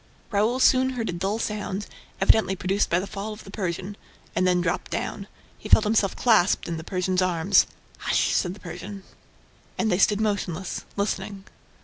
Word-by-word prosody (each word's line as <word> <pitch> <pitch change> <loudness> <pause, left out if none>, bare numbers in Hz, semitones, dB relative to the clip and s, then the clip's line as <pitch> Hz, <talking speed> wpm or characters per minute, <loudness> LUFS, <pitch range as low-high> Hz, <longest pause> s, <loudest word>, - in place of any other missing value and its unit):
Raoul 220 +5 +2
soon 260 0 +5
heard 230 -3 -3
a - - -2
dull 190 +5 -1
sound, 210 -2 -3 0.3
evidently 195 0 +4
produced 190 +2 0
by 170 - +3
the 190 - -3
fall 200 +2 -5
of 210 - -11
the 195 - -11
Persian, 190 0 -3 0.4
and 185 - +2
then 180 -1 +3
dropped 175 0 -1
down. - - -4 0.3
He - - -9
felt 220 - +7
himself 210 -3 +2
clasped 215 -6 +3
in 170 - -3
the 160 - -6
Persian's 185 +1 0
arms. 180 +1 +3 0.3
"Hush!" - - +1
said 180 0 0
the - - -14
Persian. 195 +3 -8 0.7
And 220 - +1
they 180 - +2
stood 205 +1 +4
motionless, 190 -4 -2
listening. 200 -1 -2
195 Hz, 175 wpm, -25 LUFS, 180-210 Hz, 0.7 s, felt